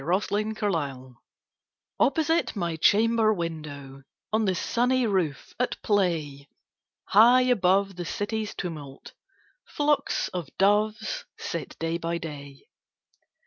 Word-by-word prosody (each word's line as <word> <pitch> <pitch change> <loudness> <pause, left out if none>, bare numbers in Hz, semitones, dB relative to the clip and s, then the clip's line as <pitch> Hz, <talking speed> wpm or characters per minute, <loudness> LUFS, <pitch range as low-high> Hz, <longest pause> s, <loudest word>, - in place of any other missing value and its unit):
Louisa 185 +8 0
May 205 - +2
Alcott 215 -1 -2
My 160 -5 0
Doves 130 -1 -13 0.8
OPPOSITE 320 +1 +2
my 170 -4 -2
chamber 220 +6 +3
window, 150 -7 -5 0.3
On 220 0 +2
the 190 -2 +1
sunny 250 +6 +1
roof, 185 -9 -1
at 250 - -1
play, 160 -9 0 0.6
High 240 +5 +7
above 195 -5 +2
the 175 - -4
city's 210 +4 -3
tumult, 150 -6 -7 0.5
Flocks 295 0 0
of 175 -6 -5
doves 215 - +1
sit - - -5
day 165 +1 -2
by 170 0 -2
day. 145 -4 -9
190 Hz, 120 wpm, -26 LUFS, 160-220 Hz, 0.8 s, High